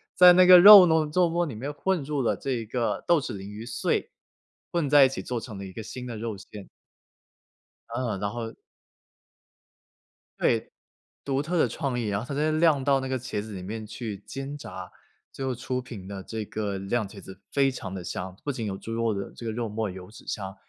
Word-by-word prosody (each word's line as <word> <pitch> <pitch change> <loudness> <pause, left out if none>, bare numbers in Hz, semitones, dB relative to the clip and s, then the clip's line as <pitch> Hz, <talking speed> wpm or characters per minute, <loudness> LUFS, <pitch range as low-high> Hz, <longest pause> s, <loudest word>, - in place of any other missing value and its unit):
在 180 -1 +9
那 180 0 +6
个 180 0 +10
肉 200 -1 +11
糯 160 -2 +2
肉 180 -2 +3
沫 170 +1 0
里 135 -8 -6
面 140 +6 -5
混 185 -1 -1
入 145 -1 -2
了 120 - 0
这 125 -5 -3
个 120 +1 -2
豆 170 -2 +5
豉 130 -4 -5
鲮 95 0 -8
鱼 105 +2 -8
碎， 115 - -1 0.6
混 165 -5 0
在 145 -2 +8
一 - - +2
起 - - -5
做 125 -2 -3
成 110 -5 -8
了 100 - -7
一 95 - -10
个 110 - -7
新 125 +3 -7
的 115 -2 -6
肉 110 -2 -4
馅。 105 0 -11 1.2
嗯， 115 -4 -3
然 100 0 -1
后 115 -1 -5 1.9
对， - - +1 0.5
独 140 0 -1
特 170 +2 -1
的 - - +4
创 135 -5 -3
意， 110 - -2
然 100 0 -1
后 115 - -6
它 140 - -5
再 155 +2 +1
酿 155 -4 +3
到 140 -1 +3
那 130 - -4
个 130 -1 -2
茄 120 - -4
子 105 +1 -7
里 95 - -6
面 110 +3 -6
去 110 -1 -6
煎 135 +2 -6
炸， - - -9 0.4
最 135 - -5
后 130 - -1
出 125 +1 -3
品 115 -7 -9
的 100 -2 -7
这 110 -1 -5
个 100 -3 -3
酿茄子 100 -2 -4
非 140 -1 +3
常 100 -7 -6
地 95 - -6
香， 90 +2 -5
不 145 - -1
仅 120 -4 -4
有 95 -2 -3
猪 115 - -8
肉 115 -1 0
的 100 0 -5
这 115 - -9
个 110 - -2
肉 115 -1 -3
沫 105 -2 -2
油 90 0 -10
脂 110 - -15
香， 95 -2 -4
120 Hz, 240 characters per minute, -26 LUFS, 105-140 Hz, 1.9 s, 肉